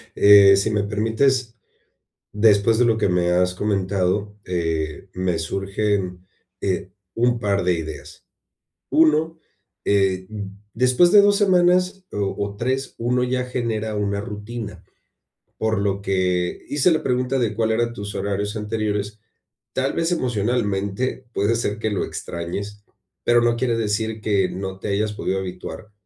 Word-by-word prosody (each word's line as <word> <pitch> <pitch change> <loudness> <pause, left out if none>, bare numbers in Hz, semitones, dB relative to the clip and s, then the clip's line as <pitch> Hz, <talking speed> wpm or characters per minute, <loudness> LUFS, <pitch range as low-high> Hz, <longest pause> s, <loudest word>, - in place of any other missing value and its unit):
eh, 100 -1 +8
si 100 +3 0
me 105 -1 +1
permites, 115 +4 0 0.8
después 105 +1 +4
de 125 - +4
lo 115 -2 +3
que 105 - +1
me 90 -1 +1
has 90 +1 +2
comentado, 100 0 -1
eh, 80 -1 -2
me 90 -2 -1
surgen, 95 0 -2 0.4
eh, 95 -1 -2 0.2
un 120 0 +2
par 100 -3 0
de 90 -1 +3
ideas. 80 -3 -7 0.7
Uno, 160 +1 +3 0.5
eh, 95 -2 +2 0.5
después 130 - +4
de 205 - +8
2 205 0 +4
semanas 185 -1 +3
o 100 -1 -2
o 100 0 -3
3, 130 +4 -2
uno 125 +2 0
ya 125 0 -1
genera 110 -3 -2
una 100 -1 -1
rutina, 105 +1 -7 0.7
por 110 -1 0
lo 100 0 -1
que 90 -2 -1
hice 145 +4 +3
la 160 - +2
pregunta 125 +1 0
de 115 -3 0
cuál 110 0 +1
eran 115 +1 0
tus 100 -2 -6
horarios 100 +1 -2
anteriores, 105 -1 -3 0.5
tal 135 +1 0
vez, 165 +1 0
emocionalmente, 115 - -1
puede 100 +3 +1
ser 110 -2 -2
que 110 0 -1
lo 100 - -1
extrañes, 100 +5 -6 0.4
pero 120 0 +4
no 120 0 +2
quiere 120 -1 0
decir 110 0 -1
que 100 -3 +1
no 95 0 -6
te - - -5
hayas 105 +1 0
podido 95 -2 -2
habituar 95 +3 -7
105 Hz, 145 wpm, -22 LUFS, 95-120 Hz, 0.8 s, eh